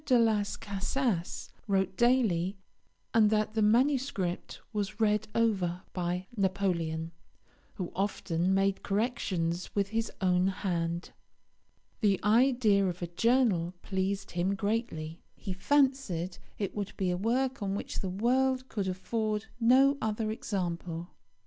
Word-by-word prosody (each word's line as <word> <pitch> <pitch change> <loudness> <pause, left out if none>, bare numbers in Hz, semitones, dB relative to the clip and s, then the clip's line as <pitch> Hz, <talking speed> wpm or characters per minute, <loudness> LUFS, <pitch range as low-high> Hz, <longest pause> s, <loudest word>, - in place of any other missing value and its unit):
de 255 - +4
Las 220 -3 +2
Casas 200 -1 -2 0.2
wrote 190 -2 +1
daily, 205 -7 +2 0.6
and 220 -2 +5
that 215 0 +1
the 220 - +1
manuscript 235 -5 +1
was 210 +1 -3
read 210 -1 +2
over 190 -6 +1
by 180 0 -2
Napoleon, 175 -5 0 0.6
who 180 -3 -4
often 185 -2 0
made 195 0 +2
corrections 185 -5 -1
with 200 -1 +1
his 225 +1 -1
own 185 -1 +3
hand. 175 -3 -2 0.9
The 200 -4 +3
idea 220 -3 +4
of 180 0 -4
a - - -2
journal 210 -6 +2
pleased 195 0 -2
him 180 +3 0
greatly. 200 -7 -2
He 195 - -5
fancied 260 - +1 0.2
it 200 -3 -2
would 205 -1 -4
be 185 -2 +1
a - - 0
work 250 +6 0
of 200 - -1
which 195 - -3
the 190 - -2
world 255 +6 +1
could 200 -3 -2
afford 210 +3 -2
no 265 +4 +5
other 215 0 -1
example. 175 -5 -3
200 Hz, 130 wpm, -30 LUFS, 180-225 Hz, 0.9 s, and